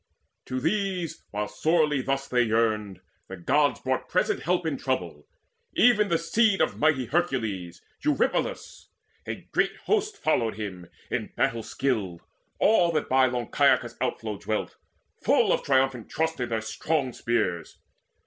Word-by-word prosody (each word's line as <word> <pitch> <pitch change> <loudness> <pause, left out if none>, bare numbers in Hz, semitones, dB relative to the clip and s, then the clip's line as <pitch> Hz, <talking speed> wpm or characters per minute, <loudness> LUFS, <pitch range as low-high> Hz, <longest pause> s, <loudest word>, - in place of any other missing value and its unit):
To 130 0 -2
these, 180 +2 -1
while 105 0 -3
sorely 150 +4 +1
thus 135 +1 -2
they 125 -1 +2
yearned, 110 -4 0 0.3
the 95 - -8
Gods 130 - +2
Brought 130 0 -2
present - - +1
help 175 +2 0
in 155 -3 0
trouble, 90 - -3 0.5
even 220 -4 +5
the 170 - +2
seed 200 +5 +2
Of 160 - 0
mighty 150 -4 +3
Hercules, 110 - -2 0.2
Eurypylus. 305 +11 -1 0.4
A - - -6
great - - +1
host 425 0 0
followed 115 - +1
him, 95 -5 -6 0.2
in - - -1
battle 115 0 +1
skilled, 110 -9 -2 0.4
All 180 -6 +4
that - - -1
by 130 0 +5
long 120 -2 -3
Caicus' - - +3
outflow 105 -3 -2
dwelt, 110 - -3 0.5
Full - - +4
of - - 0
triumphant 130 -3 +1
trust 160 -1 -1
in 120 -1 -2
their 110 -1 -1
strong 130 +4 -1
spears. 110 -9 -2
130 Hz, 145 wpm, -26 LUFS, 110-165 Hz, 0.5 s, even